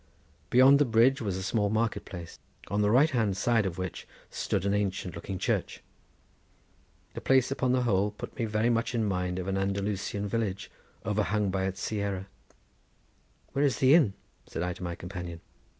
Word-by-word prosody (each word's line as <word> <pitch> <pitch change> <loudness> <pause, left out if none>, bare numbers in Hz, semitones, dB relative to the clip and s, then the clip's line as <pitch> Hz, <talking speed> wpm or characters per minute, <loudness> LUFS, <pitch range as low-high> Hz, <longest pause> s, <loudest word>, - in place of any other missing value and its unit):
Beyond 130 +3 +7
the 145 - +4
bridge 120 +3 +4
was 100 -4 -2
a 95 - -4
small 105 +1 +1
market 110 +1 0
place, 85 -2 -9 0.3
on 100 +2 +1
the 105 - +3
right 140 +8 +5
hand 110 -7 +1
side 115 -1 +2
of 90 -2 -5
which 95 -2 -5 0.2
stood 95 - -1
an 100 - +1
ancient 95 -3 -1
looking 90 +3 -5
church. - - -2 1.3
The - - -6
place 130 0 +3
upon 130 -2 +1
the 125 0 +2
whole 100 -3 +2
put 105 - -9
me 115 - -1
very 110 +2 +1
much 115 +1 0
in 115 -2 +1
mind 90 -2 -1
of 90 0 -4
an 95 0 0
Andalusian 100 +1 -2
village 100 -3 -2 0.3
overhung 105 -1 0
by 95 0 0
its 95 +1 -4
sierra. 100 -3 -2 1.3
"Where 140 - +1
is 135 -6 +2
the 130 +1 +5
inn?" 135 - +5 0.3
said 85 - -4
I 90 0 -1
to - - -13
my 85 -1 -3
companion. 90 -2 -7
105 Hz, 180 wpm, -29 LUFS, 95-115 Hz, 1.3 s, Beyond